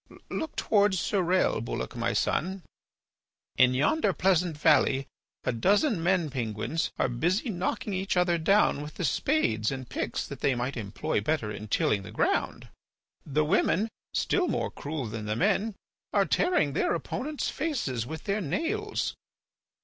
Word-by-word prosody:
"Look 320 - -3
towards 205 -2 +3
Surelle, 185 - +1
Bulloch, 115 - -4
my 120 0 0
son. 190 +2 -1 0.9
In 130 0 +5
yonder 195 - +2
pleasant 180 -4 +2
valley 145 -3 +3 0.4
a - - +1
dozen 200 - +2
men 175 -3 +1
penguins 120 +5 -2
are - - +2
busy 175 - 0
knocking 190 +2 -2
each 190 0 -1
other 175 -1 +3
down 195 -3 +3
with 150 +1 -8
the - - -4
spades 110 - +1
and 130 -2 -5
picks - - -3
that - - -8
they 135 - +2
might 125 +3 -2
employ 115 +7 -2
better 150 -9 -1
in 105 +1 -7
tilling 105 -1 +1
the 95 - -9
ground. - - -1 0.6
The 150 +1 +1
women, 195 +5 +2 0.2
still 370 -2 +1
more - - -1
cruel 145 -2 -4
than 110 -1 -5
the 105 - 0
men, 200 - +1 0.4
are - - +4
tearing 255 - +2
their - - +1
opponents' 280 - -3
faces 240 - -2
with 160 0 -6
their 205 +1 -1
nails. 185 - -1
160 Hz, 150 wpm, -28 LUFS, 130-195 Hz, 0.9 s, In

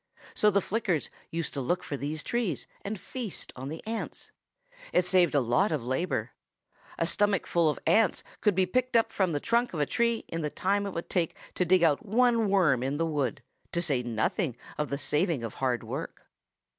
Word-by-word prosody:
So 210 - +4
the 200 -1 +3
Flickers 190 -8 -1 0.2
used 165 -1 -3
to 140 - -2
look 175 +8 0
for 145 - -4
these 145 +3 -3
trees 235 -6 -1 0.2
and 205 0 -4
feast 235 0 -5
on 130 +2 -6
the 160 +2 -7
ants. 225 0 -5 0.6
It 180 - +3
saved 180 -4 +4
a - - +6
lot 130 - +2
of 145 -7 -1
labor. 130 +9 -1 0.7
A - - +1
stomachful 180 -5 +2
of 150 - -1
ants 220 -5 +3 0.2
could 210 -4 +3
be 190 0 +3
picked 255 +5 +1 0.2
from 190 -3 +1
the 145 - 0
trunk 235 +2 +1
of - - -2
a 145 - +3
tree 235 - 0
in 165 - -3
the 150 - -1
time 200 +5 0
it 195 - -5
would 170 - -4
take 170 -3 0 0.2
to 180 - +1
dig 180 0 +4
out 150 -4 +3
one 230 0 +3
worm 170 -11 +4
in 135 +3 -1
the 165 - +1
wood, 140 -5 -1 0.3
to 170 - +1
say 145 -7 +1
nothing 120 - -1 0.2
of 150 -1 -2
the 140 - -1
saving 150 -1 0
of 115 - -4
hard 125 -3 +1
work. - - -6
170 Hz, 200 wpm, -29 LUFS, 145-205 Hz, 0.7 s, a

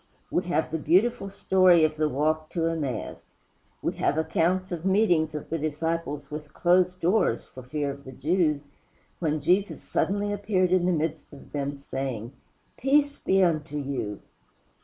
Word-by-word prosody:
We 180 - 0
have 170 -3 0
the 160 - -1
beautiful 195 +6 +2
story 185 -3 +4
of 155 0 +2
the 155 0 +1
walk 155 +3 0
to 165 -2 0
Emmaus. 150 -9 -3 0.6
We - - 0
have 145 - +1
accounts 180 +3 +1
of 170 -2 -4
meetings 180 -6 +2
of 150 - -6
the 165 - -1
disciples 155 -1 -3
with 150 0 -7
closed 180 +1 +3
doors, 175 - +2
for 130 - -11
fear 145 +3 -2
of 140 0 -10
the 130 - -9
Jews, 150 +1 0 0.5
when 155 -2 0
Jesus 180 +7 +1
suddenly 205 +1 0
appeared 195 -3 +1
in 180 -1 +3
the - - +3
midst 160 -2 -2
of 140 - -14
them, 140 -1 -2
saying, 135 -4 -5 0.4
"Peace 285 +2 +2
be 190 0 +3
unto 155 -3 0
you!" 135 -8 -4
160 Hz, 160 wpm, -26 LUFS, 145-185 Hz, 0.6 s, story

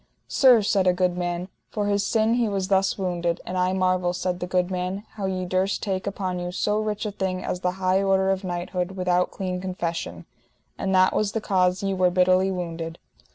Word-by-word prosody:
Sir, 250 -5 +5
said 195 -2 +2
a 180 - +5
good 180 -1 +1
man, 175 0 -2 0.2
for 210 -1 -2
his 205 0 +1
sin 220 0 +2
he 235 -2 +1
was 195 -1 -2
thus 195 -1 +2
wounded; 175 -3 -1
and 180 - -5
I 180 0 +2
marvel, 185 -1 +1
said 180 0 -2
the 180 - -3
good 180 0 0
man, 185 +2 -3
how 200 -3 -4
ye 185 -1 -2
durst 185 +2 0
take 190 -2 -2
upon 185 -2 -2
you 175 0 -4
so 210 +3 0
rich 215 0 -2
a 210 - -2
thing 190 -2 -3
as 180 - -3
the 180 0 -1
high 190 0 +2
order 195 -1 +2
of 190 0 -1
knighthood 180 0 -3
without 180 -1 +1
clean 185 -1 -4
confession, 170 - -4 0.5
and 190 0 -1
that 185 0 +5
was 210 -1 0
the 225 - 0
cause 185 -2 +1
ye 195 0 0
were 185 -1 +3
bitterly 185 +1 +3
wounded. 165 -3 -4
185 Hz, 210 wpm, -24 LUFS, 180-195 Hz, 0.5 s, Sir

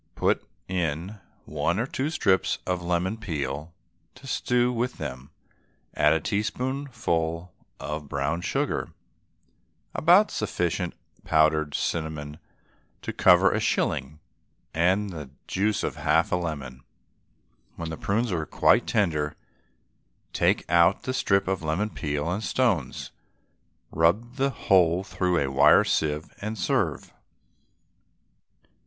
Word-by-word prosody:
Put - - +1 0.2
in 90 +3 -2 0.3
one 75 +4 -1
or 115 - 0
two 135 +2 -2
strips 95 - +1
of 90 -1 -1
lemon 90 +4 -1
peel 75 -6 -4 0.4
to 130 +1 -15
stew 125 -1 +1
with 125 +1 -2
them, 65 -2 -6 0.6
add 75 +1 +4
a 80 - +1
teaspoonful 105 - -2 0.3
of 75 -1 -5
brown 70 +5 -1
sugar, - - -2 1.0
about 180 +6 +5
sufficient 90 -4 -2 0.3
powdered 75 -1 +2
cinnamon 80 -2 -3 0.6
to - - -4
cover - - +5
a - - 0
shilling, 70 +4 -1 0.5
and 95 +5 +2
the 75 -6 -7 0.2
juice 105 +2 0
of - - -3
half - - +2
a - - +3
lemon. 70 -7 -4 0.9
When 85 -1 -5
the - - -3
prunes 115 +1 0
are 80 -4 -2
quite - - +3
tender 75 -8 0 1.0
take - - +1
out 85 +3 +4
the 130 - -2
strip 95 -6 +1
of 95 -2 -1
lemon 85 +7 -1
peel 75 0 -3
and 100 +5 -2
stones, 110 - 0 0.8
rub 105 - +1
the 135 0 +2
whole 90 -7 +3
through 90 -2 0
a 70 -4 0
wire 65 - +6
sieve, 75 0 -1
and 110 +2 -4
serve. - - -1
85 Hz, 120 wpm, -26 LUFS, 75-105 Hz, 1.0 s, wire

